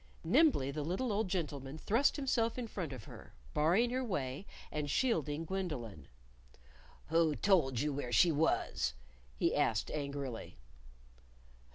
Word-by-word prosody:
Nimbly 195 Hz, -, +4 dB
the 150 Hz, +2 st, -3 dB
little 190 Hz, -, -1 dB
old 210 Hz, 0 st, 0 dB
gentleman 150 Hz, -6 st, -3 dB
thrust 230 Hz, -, +2 dB
himself 250 Hz, -5 st, 0 dB
in 250 Hz, -, -2 dB
front 185 Hz, -9 st, -5 dB
of 125 Hz, -5 st, -7 dB
her, -, -, -12 dB, 0.2 s
barring 185 Hz, +11 st, +3 dB
her 260 Hz, +1 st, 0 dB
way, 145 Hz, -, -3 dB, 0.2 s
and 150 Hz, -1 st, -2 dB
shielding 160 Hz, -, 0 dB
Gwendolyn. 140 Hz, -, -4 dB, 1.0 s
"Who 165 Hz, -1 st, +3 dB
told 155 Hz, -, +3 dB
you 150 Hz, 0 st, 0 dB
where 135 Hz, -3 st, -4 dB
she 170 Hz, +6 st, +5 dB
was?" 145 Hz, -, +1 dB, 0.4 s
he -, -, +1 dB
asked -, -, +1 dB
angrily. 140 Hz, -5 st, -4 dB
160 Hz, 135 wpm, -34 LUFS, 140-205 Hz, 1.0 s, she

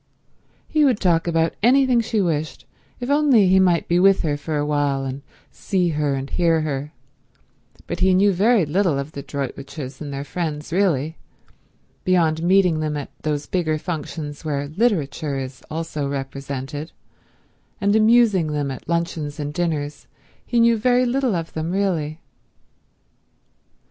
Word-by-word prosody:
He 310 Hz, -, +2 dB
would 255 Hz, -7 st, +3 dB
talk 170 Hz, -3 st, +2 dB
about 165 Hz, -1 st, +1 dB
anything 255 Hz, +1 st, +4 dB
she 220 Hz, -2 st, 0 dB
wished 160 Hz, -4 st, -2 dB, 0.3 s
if 245 Hz, +2 st, -3 dB
only 280 Hz, -9 st, +4 dB
he 190 Hz, +1 st, +5 dB
might 180 Hz, -3 st, +3 dB
be 175 Hz, +1 st, +2 dB
with 195 Hz, +1 st, +4 dB
her 150 Hz, -3 st, 0 dB
for 150 Hz, +1 st, -3 dB
a 145 Hz, -, 0 dB
while 145 Hz, -2 st, 0 dB
and 135 Hz, +1 st, -5 dB, 0.3 s
see 180 Hz, -3 st, 0 dB
her 150 Hz, -3 st, 0 dB
and 135 Hz, 0 st, -4 dB
hear 165 Hz, 0 st, +2 dB
her, 145 Hz, -1 st, -3 dB, 0.9 s
but 175 Hz, -, -5 dB
he 185 Hz, 0 st, +4 dB
knew 200 Hz, +1 st, +4 dB
very 205 Hz, +1 st, +3 dB
little 165 Hz, 0 st, +1 dB
of 140 Hz, +2 st, -4 dB
the 140 Hz, -, -6 dB
Droitwiches 135 Hz, 0 st, -6 dB
and 145 Hz, -2 st, -5 dB
their 140 Hz, 0 st, -4 dB
friends 155 Hz, -1 st, -4 dB
really—beyond 165 Hz, 0 st, -2 dB
meeting 180 Hz, -2 st, +3 dB
them 155 Hz, -1 st, -2 dB
at 145 Hz, -, -6 dB
those 150 Hz, -1 st, -2 dB
bigger 160 Hz, -4 st, 0 dB
functions 155 Hz, -2 st, -5 dB
where 145 Hz, -2 st, -2 dB
literature 155 Hz, -, 0 dB
is 130 Hz, -1 st, -6 dB
also 155 Hz, -2 st, -3 dB
represented, 140 Hz, +2 st, -5 dB, 0.9 s
and 200 Hz, +1 st, +2 dB
amusing 215 Hz, -7 st, +4 dB
them 145 Hz, -2 st, -1 dB
at 130 Hz, -, -9 dB
luncheons 165 Hz, -3 st, -2 dB
and 145 Hz, 0 st, -4 dB
dinners, 150 Hz, -4 st, -3 dB, 0.4 s
he 240 Hz, -, 0 dB
knew 230 Hz, 0 st, +5 dB
very 250 Hz, +2 st, +3 dB
little 250 Hz, -3 st, +1 dB
of 165 Hz, -1 st, -4 dB
them 160 Hz, +1 st, -3 dB
really. 170 Hz, -5 st, -1 dB
160 Hz, 150 wpm, -22 LUFS, 145-190 Hz, 0.9 s, he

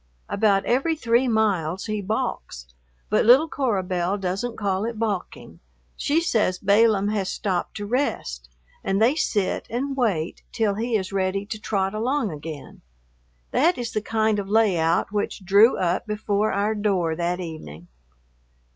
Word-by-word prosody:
About 200 Hz, -2 st, +2 dB
every 275 Hz, +7 st, +1 dB
three 245 Hz, -3 st, +2 dB
miles 195 Hz, -6 st, 0 dB
he 215 Hz, -1 st, -2 dB
balks, 190 Hz, -, -3 dB, 0.5 s
but -, -, +3 dB
little 260 Hz, +8 st, +6 dB
Cora 240 Hz, -11 st, -1 dB
Belle 180 Hz, +1 st, -1 dB
doesn't 195 Hz, +5 st, -3 dB
call 195 Hz, -2 st, -1 dB
it 230 Hz, 0 st, -3 dB
balking, 210 Hz, -5 st, -4 dB, 0.4 s
she 295 Hz, +3 st, +1 dB
says 215 Hz, -, +1 dB
Balaam 205 Hz, +1 st, +3 dB
has 205 Hz, -3 st, -1 dB
stopped 185 Hz, -4 st, -2 dB
to 205 Hz, -, -4 dB
rest, 200 Hz, -, -2 dB, 0.3 s
and 195 Hz, +1 st, 0 dB
they 230 Hz, +5 st, +4 dB
sit 210 Hz, -10 st, -1 dB
and 270 Hz, +4 st, -2 dB
wait 195 Hz, -11 st, -1 dB
till 215 Hz, -3 st, +1 dB
he 230 Hz, +3 st, -2 dB
is 195 Hz, -2 st, -2 dB
ready 195 Hz, +1 st, -1 dB
to 215 Hz, 0 st, -6 dB
trot 195 Hz, -2 st, -1 dB
along 235 Hz, +1 st, -1 dB
again. 150 Hz, -1 st, -9 dB, 0.7 s
That 340 Hz, +6 st, +3 dB
is 240 Hz, -2 st, -4 dB
the 215 Hz, -, 0 dB
kind 220 Hz, -1 st, 0 dB
of 195 Hz, -1 st, -5 dB
layout 185 Hz, -6 st, +2 dB
which 205 Hz, -2 st, -3 dB
drew 205 Hz, +6 st, +5 dB
up 180 Hz, +3 st, -1 dB
before 210 Hz, 0 st, 0 dB
our 205 Hz, +2 st, 0 dB
door 195 Hz, -6 st, 0 dB
that 175 Hz, +2 st, -1 dB
evening. 155 Hz, -, -8 dB
205 Hz, 155 wpm, -24 LUFS, 185-225 Hz, 0.7 s, little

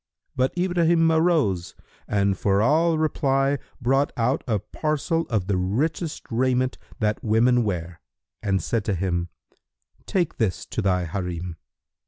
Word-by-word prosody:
But 130 Hz, +6 st, 0 dB
Ibrahim 170 Hz, -2 st, +3 dB
arose 160 Hz, -, +1 dB, 0.3 s
and 100 Hz, -1 st, +1 dB
for 100 Hz, 0 st, +1 dB
all 160 Hz, +8 st, +3 dB
reply 140 Hz, -3 st, +1 dB, 0.2 s
brought 135 Hz, +3 st, +2 dB
out 120 Hz, +3 st, +1 dB
a 110 Hz, -3 st, +2 dB
parcel 155 Hz, -, -2 dB
of 110 Hz, -7 st, 0 dB
the 95 Hz, -1 st, 0 dB
richest 145 Hz, -, -1 dB
raiment 130 Hz, +2 st, +1 dB, 0.2 s
that 105 Hz, -1 st, 0 dB
women 120 Hz, +3 st, +3 dB
wear 90 Hz, -5 st, -4 dB, 0.4 s
and 95 Hz, -2 st, 0 dB
said 115 Hz, -3 st, -1 dB
to 100 Hz, -, 0 dB
him, 85 Hz, -1 st, -1 dB, 0.8 s
"Take 175 Hz, -4 st, 0 dB
this 110 Hz, -7 st, -1 dB
to -, -, -3 dB
thy 90 Hz, -3 st, +1 dB
Harim." 90 Hz, -1 st, -4 dB
120 Hz, 135 wpm, -24 LUFS, 95-155 Hz, 0.8 s, Ibrahim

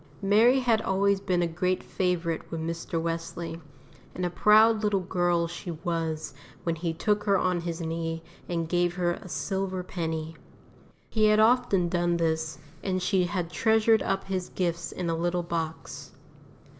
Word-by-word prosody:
Mary 225 Hz, +7 st, +5 dB
had 230 Hz, -3 st, +2 dB
always 200 Hz, +1 st, +2 dB
been 180 Hz, -3 st, 0 dB
a -, -, +1 dB
great 180 Hz, +2 st, -1 dB
favourite 175 Hz, -3 st, -1 dB
with 165 Hz, -, -4 dB
Mr. 165 Hz, +1 st, -3 dB
Wesley, 165 Hz, 0 st, -4 dB, 0.5 s
and 180 Hz, -, -2 dB
a 175 Hz, -, -1 dB
proud 215 Hz, +4 st, +5 dB
little 205 Hz, -2 st, +1 dB
girl 175 Hz, -1 st, +1 dB
she 175 Hz, +2 st, -7 dB
was 165 Hz, -3 st, -3 dB, 0.3 s
when 170 Hz, -, 0 dB
he 165 Hz, +1 st, -2 dB
took 205 Hz, +5 st, 0 dB
her 200 Hz, -2 st, +4 dB
on 180 Hz, -1 st, 0 dB
his 170 Hz, 0 st, -4 dB
knee 165 Hz, 0 st, -3 dB, 0.3 s
and 165 Hz, -2 st, -1 dB
gave 175 Hz, +1 st, +1 dB
her 175 Hz, -2 st, +1 dB
a 180 Hz, -, -7 dB
silver 190 Hz, 0 st, -2 dB
penny. 160 Hz, -3 st, -4 dB, 0.8 s
He 215 Hz, -1 st, +3 dB
had 215 Hz, 0 st, +5 dB
often 220 Hz, -5 st, +4 dB
done 175 Hz, 0 st, +1 dB
this, 160 Hz, -2 st, -1 dB, 0.2 s
and 185 Hz, -1 st, -1 dB
she 185 Hz, 0 st, +2 dB
had 175 Hz, -2 st, -3 dB
treasured 220 Hz, +1 st, +3 dB
up 195 Hz, -, -1 dB
his 185 Hz, -2 st, -3 dB
gifts 170 Hz, -2 st, -2 dB
in 180 Hz, -, -4 dB
a 165 Hz, -, 0 dB
little 175 Hz, +1 st, 0 dB
box. 165 Hz, -2 st, -5 dB
175 Hz, 165 wpm, -27 LUFS, 165-195 Hz, 0.8 s, Mary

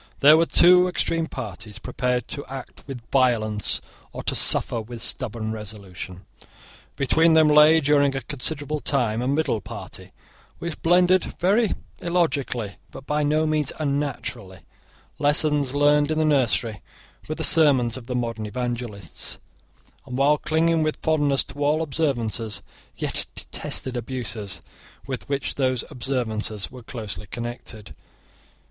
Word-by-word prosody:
There 150 Hz, +2 st, +9 dB
were 165 Hz, +1 st, +3 dB
two 180 Hz, +1 st, +6 dB
extreme 165 Hz, -2 st, -1 dB
parties, 105 Hz, -, -7 dB
prepared 125 Hz, +1 st, -2 dB
to 140 Hz, -, -5 dB
act 135 Hz, -1 st, -8 dB
with 125 Hz, -4 st, -8 dB
violence 110 Hz, -6 st, +2 dB, 0.3 s
or -, -, -7 dB
to -, -, +1 dB
suffer 115 Hz, -, +2 dB
with 115 Hz, +2 st, -9 dB
stubborn 115 Hz, -2 st, -1 dB
resolution. 100 Hz, -4 st, -8 dB, 0.7 s
Between 160 Hz, +4 st, +3 dB
them 160 Hz, -1 st, +6 dB
lay, 150 Hz, +2 st, +7 dB
during 145 Hz, -1 st, +3 dB
a 135 Hz, -, -2 dB
considerable 145 Hz, +3 st, -2 dB
time, 120 Hz, -6 st, 0 dB
a 125 Hz, -, -1 dB
middle 140 Hz, -6 st, 0 dB
party, -, -, -9 dB, 0.5 s
which 170 Hz, -2 st, -6 dB
blended, 180 Hz, +2 st, +4 dB
very 205 Hz, +4 st, +3 dB, 0.3 s
illogically, 140 Hz, -, -1 dB
but 135 Hz, -, -11 dB
by 150 Hz, +1 st, 0 dB
no 155 Hz, +2 st, +2 dB
means 155 Hz, -2 st, +1 dB
unnaturally, 140 Hz, -, -3 dB, 0.6 s
lessons 145 Hz, -2 st, +2 dB
learned 145 Hz, 0 st, +4 dB
in 155 Hz, -, 0 dB
the 155 Hz, -, +2 dB
nursery 125 Hz, -7 st, +1 dB, 0.5 s
with 155 Hz, -, -4 dB
the -, -, -3 dB
sermons 140 Hz, -7 st, +4 dB
of 125 Hz, -3 st, -9 dB
the 125 Hz, -, -3 dB
modern 115 Hz, -3 st, -2 dB
evangelists, 120 Hz, -6 st, -5 dB, 0.7 s
and, 125 Hz, -1 st, -4 dB
while 145 Hz, +2 st, +4 dB
clinging 165 Hz, +1 st, +2 dB
with 155 Hz, 0 st, 0 dB
fondness 145 Hz, -4 st, +2 dB
to 145 Hz, -, -5 dB
all 150 Hz, +3 st, +2 dB
observances, 120 Hz, -8 st, -2 dB, 0.3 s
yet -, -, -2 dB
detested 130 Hz, -1 st, -3 dB
abuses 115 Hz, -5 st, -3 dB, 0.4 s
with 130 Hz, 0 st, -6 dB
which 140 Hz, -1 st, -1 dB
those 130 Hz, -3 st, 0 dB
observances 110 Hz, -5 st, -2 dB
were 125 Hz, -1 st, -10 dB
closely 110 Hz, -4 st, -7 dB
connected. 120 Hz, -1 st, -7 dB
135 Hz, 135 wpm, -24 LUFS, 115-150 Hz, 0.7 s, There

